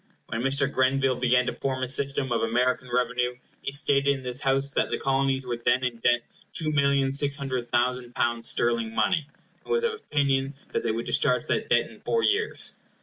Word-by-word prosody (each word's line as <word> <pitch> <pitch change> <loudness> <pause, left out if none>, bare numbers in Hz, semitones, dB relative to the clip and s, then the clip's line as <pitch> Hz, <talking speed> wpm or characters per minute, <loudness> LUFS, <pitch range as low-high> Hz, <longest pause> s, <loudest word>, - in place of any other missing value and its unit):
When 115 - -2
Mr. 135 +2 +2
Grenville 130 -1 +2
began 125 0 +3
to - - -2
form 130 -1 -3
his 130 +1 +1
system 140 -2 0
of 115 - +1
American 125 +2 0
revenue, 125 0 0 0.3
he - - -3
stated 140 0 +3
in 140 -2 +1
this 125 +1 -3
House 135 0 +1
that - - 0
the - - -1
Colonies 135 -1 0
were 120 -1 -3
then 120 +2 +1
in 125 -2 -1
debt 120 +1 +2 0.3
two 155 -2 -2
millions 140 -1 +2
six 140 -1 +1
hundred 130 -4 -4
thousand 125 0 0
pounds 120 -1 0
sterling 115 -1 0
money, 155 -6 +1 0.4
and - - -8
was 470 0 +2
of 465 -1 +1
opinion 140 - 0 0.2
they - - -1
would 115 +2 -3
discharge 125 -3 +1
that - - -1
debt - - +3
in - - -15
four 460 -1 0
years. 435 +2 0
130 Hz, 200 wpm, -26 LUFS, 125-140 Hz, 0.4 s, began